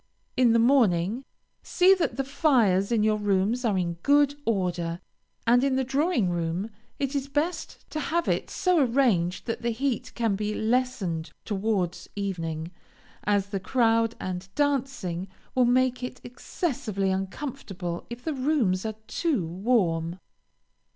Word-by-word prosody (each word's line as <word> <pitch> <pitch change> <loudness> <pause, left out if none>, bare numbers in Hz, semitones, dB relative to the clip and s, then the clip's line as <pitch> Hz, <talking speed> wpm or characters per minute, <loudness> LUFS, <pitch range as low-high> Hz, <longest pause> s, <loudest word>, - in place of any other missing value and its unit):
In 250 -2 +4
the - - +5
morning, 230 -2 +3 0.4
see 370 +1 +5
that 370 -7 -1
the 270 - +1
fires 240 - +2
in 225 -3 +3
your 215 0 +3
rooms 205 +4 +1
are 215 -5 +1
in 170 -2 -1
good 285 +2 +4
order; 175 -5 -1 0.5
and 245 +2 +5
in 275 -1 +2
the 265 - +1
drawing 270 - +1
room, 175 +5 -2 0.3
it 275 0 -2
is 280 -1 -1
best 295 +5 -3
to 310 - -2
have 335 +3 -1
it - - 0
so 365 -2 +2
arranged 230 -9 +1
that 230 - -3
the 235 - 0
heat 255 +2 -2
can 225 -4 +1
be 210 +1 -2
lessened 220 -9 -1
towards 195 -4 -1
evening, 165 -5 -3 0.5
as 205 -1 +1
the 200 -1 -2
crowd, 230 +1 +2
and 185 0 -5
dancing, 270 -11 -1 0.3
will 255 -1 +4
make 255 +1 +2
it 250 0 -5
excessively 240 - -2
uncomfortable 190 -3 -4
if 240 +1 -8
the 320 - -1
rooms 255 -9 +1
are 220 - -4
too 270 - 0
warm. 175 -3 0
225 Hz, 145 wpm, -27 LUFS, 185-265 Hz, 0.5 s, the